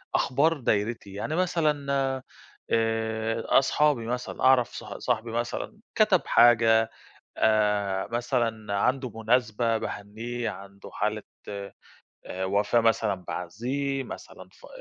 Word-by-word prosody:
أخبار 155 Hz, +5 st, +2 dB
دايرتي. 105 Hz, -3 st, -1 dB
يعني 145 Hz, +10 st, -3 dB
مثلًا 155 Hz, -6 st, +1 dB, 0.8 s
آآ، 115 Hz, 0 st, 0 dB, 0.2 s
أصحابي 140 Hz, -3 st, +2 dB
مثلًا، 125 Hz, +1 st, -4 dB
أعرف 130 Hz, -2 st, +5 dB
ص -, -, -7 dB
صاحبي 115 Hz, +1 st, -2 dB
مثلًا 120 Hz, -, -3 dB, 0.2 s
كَتَب 210 Hz, -5 st, +4 dB
حاجة، 115 Hz, -1 st, +5 dB, 0.5 s
آآ، 105 Hz, -3 st, +2 dB
مثلًا 120 Hz, -4 st, -1 dB
عندُه 130 Hz, +3 st, +1 dB
مناسبة 115 Hz, 0 st, +1 dB
باهنّيه، 115 Hz, +4 st, -4 dB
عنده 100 Hz, 0 st, -10 dB
حالة 105 Hz, +1 st, -1 dB, 0.3 s
آآ، 100 Hz, -1 st, -6 dB, 0.7 s
وفاة 100 Hz, +4 st, +2 dB
مثلًا 115 Hz, -2 st, +2 dB
باعزّيه، 130 Hz, +10 st, -3 dB
مثلًا -, -, -10 dB
ف -, -, -16 dB
115 Hz, 105 wpm, -27 LUFS, 105-130 Hz, 0.8 s, أعرف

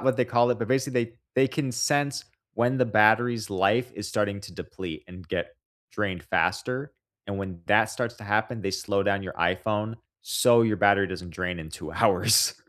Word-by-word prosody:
what 130 Hz, +2 st, +1 dB
they 125 Hz, -, +2 dB
call 120 Hz, 0 st, +3 dB
it, 120 Hz, -, 0 dB
but, 115 Hz, -, -3 dB
basically, 130 Hz, -2 st, +1 dB
they 115 Hz, -, -13 dB, 0.2 s
they 130 Hz, +1 st, +4 dB
can 130 Hz, -1 st, -2 dB
sense 145 Hz, +3 st, 0 dB, 0.3 s
when 120 Hz, +4 st, +1 dB
the 125 Hz, -, +3 dB
battery's 110 Hz, +1 st, +3 dB
life 105 Hz, +6 st, +1 dB
is 105 Hz, -, -6 dB
starting 100 Hz, -1 st, -1 dB
to 90 Hz, -3 st, -11 dB
deplete, 85 Hz, -3 st, -7 dB
and 90 Hz, -2 st, -12 dB
get -, -, -4 dB, 0.3 s
drained 95 Hz, -6 st, -3 dB
faster. 130 Hz, +3 st, -1 dB, 0.3 s
And 100 Hz, -1 st, -4 dB
when 95 Hz, -3 st, -6 dB
that 105 Hz, +1 st, +4 dB
starts 120 Hz, +1 st, -4 dB
to 105 Hz, -, -12 dB
happen, 110 Hz, +3 st, 0 dB
they 95 Hz, -, -1 dB
slow 100 Hz, +1 st, -1 dB
down 100 Hz, -1 st, 0 dB
your 90 Hz, -, -6 dB
iPhone, 105 Hz, +5 st, -1 dB, 0.3 s
so 120 Hz, 0 st, +4 dB
your 110 Hz, -2 st, +1 dB
battery 100 Hz, -1 st, +4 dB
doesn't 90 Hz, -1 st, -7 dB
drain 90 Hz, +1 st, -3 dB
in 80 Hz, -1 st, -9 dB
2 -, -, -8 dB
hours. -, -, +4 dB
110 Hz, 195 wpm, -26 LUFS, 100-125 Hz, 0.3 s, they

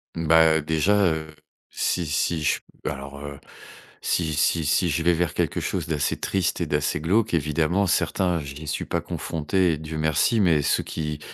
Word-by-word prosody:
Mmh 85 Hz, -, -3 dB
bah, 80 Hz, 0 st, +5 dB
déjà, 80 Hz, +7 st, +2 dB
heu, 80 Hz, -2 st, 0 dB, 0.4 s
si 90 Hz, -, -1 dB
si 80 Hz, +2 st, 0 dB
je 75 Hz, -, +1 dB, 0.2 s
Bah -, -, -2 dB
alors, 70 Hz, +1 st, -9 dB
heu, 70 Hz, -1 st, -8 dB, 0.6 s
si 80 Hz, -3 st, 0 dB
si 75 Hz, +2 st, +1 dB
si 85 Hz, +4 st, +2 dB
je 80 Hz, +2 st, 0 dB
vais 85 Hz, +1 st, +4 dB
vers 85 Hz, 0 st, 0 dB
quelque -, -, 0 dB
chose -, -, -2 dB
d'assez 75 Hz, -3 st, -1 dB
triste 95 Hz, -2 st, -1 dB
et -, -, +1 dB
d'assez 75 Hz, 0 st, 0 dB
glauque, 105 Hz, +7 st, +1 dB
évidemment, 80 Hz, +5 st, +1 dB
certains, 90 Hz, -1 st, +1 dB
je 70 Hz, -1 st, -8 dB
n'y 75 Hz, +2 st, -9 dB
suis 75 Hz, -, -2 dB
pas -, -, -2 dB
confronté 85 Hz, +3 st, -1 dB
et -, -, -3 dB
Dieu 80 Hz, +1 st, -6 dB
merci. 80 Hz, -, +2 dB
Mais 85 Hz, -7 st, +3 dB
ceux -, -, +1 dB
qui 75 Hz, -2 st, -4 dB
80 Hz, 190 wpm, -24 LUFS, 75-85 Hz, 0.6 s, bah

